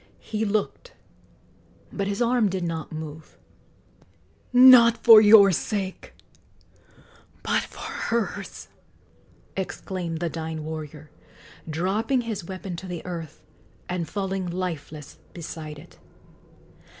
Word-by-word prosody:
He 220 0 -2
looked, 215 - -2 1.0
but 200 -1 -2
his 205 +4 0
arm 235 -3 +2
did 185 -1 -3
not 165 -2 -4
move. 155 0 -9 1.1
"Not 245 -2 +8
for 225 -2 +10
your 205 -2 +8
sake, 190 +1 -4 1.3
but - - +1
for - - -11
hers!" 235 -1 -3 0.9
exclaimed 180 -3 -4
the 170 - -1
dying 160 -1 -5
warrior, 155 -1 -8 0.6
dropping 205 - 0
his 225 -6 -5
weapon 185 0 -7
to 190 - -8
the 175 -2 -6
earth 165 -4 -7 0.4
and 175 -4 -3
falling 195 -1 -3
lifeless 165 -5 -6 0.2
beside 155 -3 -7
it. 160 +4 -16
185 Hz, 105 wpm, -25 LUFS, 160-215 Hz, 1.3 s, for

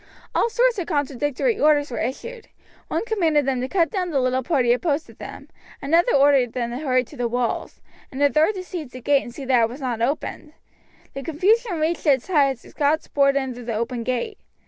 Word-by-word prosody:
All - - +2
sorts 485 -1 +2
of 345 - -4
contradictory 290 - -1
orders 290 -2 +3
were - - -3
issued. 455 - -5 0.4
One - - -2
commanded 330 - +1
them 260 -2 0
to 255 - -2
cut 340 +1 +1
down 370 -4 -2
the 285 -5 +1
little 255 0 +1
party 255 -3 +2
opposed 295 +3 -1
to - - -15
them, - - -10 0.3
another 330 +4 +2
ordered 275 -4 +4
them 235 -2 -2
to 240 - -4
hurry 255 -4 +1
to - - -14
the 245 -1 -1
walls, 240 0 -2 0.3
a 285 +2 +2
third 315 +7 +3
to 370 - -5
seize 345 -7 -6
the 255 - -7
gate 280 +3 +3
and 240 - -9
see 270 +3 -8
that 255 -2 +3
it 225 - +2
was 250 +4 -9
not 245 -4 -3
opened. 295 +4 -3 0.6
The 275 - -5
confusion 370 - +1
reached 320 +1 -1
its 270 +2 +2
height 290 -6 +4
as 240 - -19
the - - -15
Scots 300 +1 0
poured 275 -1 +3
in 265 -2 -1
through 245 0 -10
the 230 -2 -3
open 235 +2 -2
gate. 255 - -3
285 Hz, 220 wpm, -23 LUFS, 255-330 Hz, 0.6 s, ordered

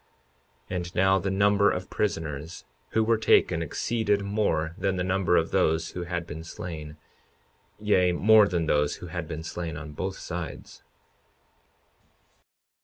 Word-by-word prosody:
52:40 - - -2
And 90 0 -5
now 95 +1 +4
the 95 - -2
number 100 +1 +3
of 90 0 -4
prisoners 80 -5 -3 0.3
who 110 - +3
were 115 0 +2
taken 85 -6 +3
exceeded 105 +5 0
more 100 -6 0
than 95 0 -1
the 90 - -1
number 90 -1 +2
of 80 - 0
those 80 -3 +1
who 90 -1 -5
had 85 -1 -3
been 80 0 -7
slain, 80 -2 -7 0.8
yea, 95 -4 +3
more 105 +3 +6
than 85 -4 -1
those 75 -1 +1
who 90 - -9
had 85 -3 -4
been 80 +1 -5
slain 80 -2 -5
on 80 0 -8
both 95 +6 -4
sides. 85 -1 -7
90 Hz, 150 wpm, -27 LUFS, 80-100 Hz, 0.8 s, more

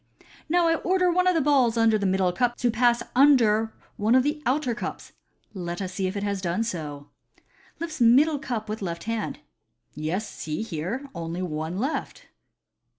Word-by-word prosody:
" - - -23
Now 345 +1 +3
I 330 0 +3
order 365 +1 +2
one 365 +1 +2
of 365 - +3
the 325 - +3
balls 265 -5 +3
under 225 -1 +4
the 200 - 0
middle 185 -1 +1
cup 240 +4 0
to 245 - +1
pass 240 +1 +2
under 230 -6 +5 0.3
one 220 +2 +3
of 260 - +5
the 300 +2 -1
outer 255 -1 +1
cups. 235 - -6 0.4
Let 175 -3 -5
us 185 -2 -4
see 190 0 -1
if 190 +2 -4
it 200 - -3
has 200 -2 -2
done 180 +4 0
so 150 -9 -5 0.3
" - - -32
(lifts 315 -4 -5
middle 280 +6 +5
cup 235 -6 -4
with 215 +1 -5
left 170 -3 -4
hand). 225 -1 -3 0.3
" - - -49
Yes, 165 +8 -4
here 175 - -3
is 280 - -11
only 170 +1 -4
one 160 +1 -3
left." 270 +9 -3
225 Hz, 195 wpm, -25 LUFS, 185-270 Hz, 0.4 s, under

